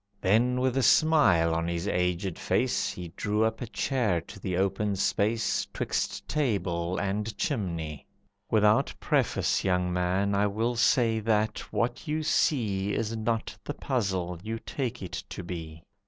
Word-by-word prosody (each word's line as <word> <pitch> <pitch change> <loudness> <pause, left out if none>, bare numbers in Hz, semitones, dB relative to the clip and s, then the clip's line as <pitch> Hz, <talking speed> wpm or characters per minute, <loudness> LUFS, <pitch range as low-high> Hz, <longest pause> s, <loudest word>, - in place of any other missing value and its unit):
Then, 120 +6 +2
with 130 -1 +1
a - - +3
smile 115 - +4
on 85 0 -1
his 85 +2 -2
aged 90 -1 -1
face, - - +1
He 90 -2 -6
drew 105 +1 0
up 110 0 -1
a 120 - -3
chair 115 -6 0
to 100 - -12
the 90 -2 -2
open 100 +2 0
space 110 +3 +1
'Twixt - - -2
table 95 - -1
and 105 +2 -2
chimney. 85 - -3 0.4
"Without 105 0 +3
preface, - - +1
Young 90 -1 +1
man, 90 +3 +1
I 100 +1 +3
will 115 +4 -1
say 120 -2 +3
that 110 0 +1
what 120 +5 -1
you 155 +1 -1
see 105 - +1
Is 115 0 -1
not 115 0 -2
the - - -5
puzzle 95 -8 -2
you 110 +3 -4
take 125 -1 -4
it 90 - -5
to - - -6
be." 80 -2 -7
105 Hz, 155 wpm, -28 LUFS, 90-115 Hz, 0.4 s, smile